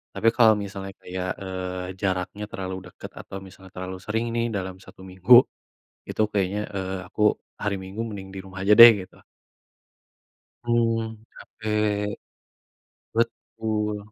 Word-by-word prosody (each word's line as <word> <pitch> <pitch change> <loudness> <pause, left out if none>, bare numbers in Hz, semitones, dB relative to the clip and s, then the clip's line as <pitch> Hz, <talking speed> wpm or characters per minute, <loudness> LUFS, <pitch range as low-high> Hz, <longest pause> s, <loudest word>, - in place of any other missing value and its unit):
Tapi 115 - 0
kalau 115 -2 +6
misalnya 100 -1 -6
kayak, 90 0 -4
eee, 90 -1 -4 0.2
jaraknya 95 +1 -2
terlalu 95 -1 -4 0.2
deket - - -10
atau 95 - -8
misalnya 95 0 -14
terlalu 95 0 -5
sering 110 +2 -1
nih, 115 0 +1
dalam 95 -1 -3
1 95 - -15
minggu, 95 +5 +3 0.8
itu - - 0
kayaknya, 100 0 0 0.2
eee, 95 0 -3
aku 105 - -3 0.3
hari 105 -1 -2
Minggu 95 +3 -7
mending 100 -4 -7
di - - -6
rumah 95 0 -9
aja 105 +2 +5
deh, 115 0 +13
gitu. 95 - -12 1.5
Hmm, 115 -1 +1 0.2
capek. 105 -1 -2 1.0
Betul. 110 -2 -1
100 Hz, 130 wpm, -25 LUFS, 95-110 Hz, 1.5 s, deh